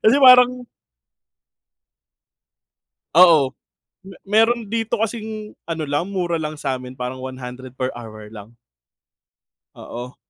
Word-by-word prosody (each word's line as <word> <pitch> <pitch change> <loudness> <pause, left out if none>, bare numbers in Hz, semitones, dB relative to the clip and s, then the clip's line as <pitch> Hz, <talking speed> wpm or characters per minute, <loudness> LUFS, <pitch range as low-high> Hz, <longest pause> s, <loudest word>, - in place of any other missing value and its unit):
Kasi 225 +6 +5
parang 250 -1 +7 2.5
Oo. 160 -7 +6 0.5
Me 190 -1 -13
meron 225 +3 +2
dito 225 +1 -2
kasing 220 -1 -4 0.2
ano 160 -2 -3
lang, 145 +7 -2
mura 175 -4 -2
lang 155 0 -5
sa'min. 130 -2 -5
Parang 125 +1 -5
100 130 0 -8
per 130 0 -2
hour 110 -3 -10
lang. 110 +2 -12 1.2
Oo. 125 +2 -9
160 Hz, 105 wpm, -21 LUFS, -, 2.5 s, parang